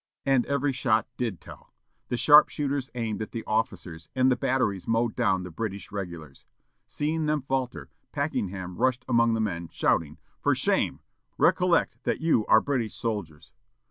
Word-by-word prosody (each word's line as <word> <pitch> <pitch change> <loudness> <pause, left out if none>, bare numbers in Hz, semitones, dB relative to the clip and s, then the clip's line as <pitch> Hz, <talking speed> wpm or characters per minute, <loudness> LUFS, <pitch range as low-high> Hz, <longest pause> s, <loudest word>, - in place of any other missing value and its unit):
And 135 -3 +2
every 140 0 +1
shot 120 -3 +1
did 110 -9 -3
tell. - - -14 0.3
The 120 - -2
sharpshooters 140 +1 +4
aimed 110 -3 -3
at 110 - -6
the 115 - -4
officers, 90 -7 -3
and 130 0 +4
the - - +3
batteries 120 -6 -1
mowed 115 0 +1
down 95 -1 +1
the 90 - -8
British 100 +1 -5
regulars. 85 -8 -7 0.4
Seeing 155 +1 -2
them 150 -2 0
falter, 130 -2 -3 0.2
Packenham 95 - -3
rushed 130 -1 +1
among 115 -2 +3
the - - -1
men, 85 -6 -2
shouting, 75 -2 0 0.2
"For - - +2
shame! - - 0 0.4
recollect 180 -2 +3
that - - -1
you 160 -10 +2
are 110 - +6
British 125 -6 -2
soldiers!" 80 - -5
115 Hz, 155 wpm, -27 LUFS, 95-135 Hz, 0.4 s, are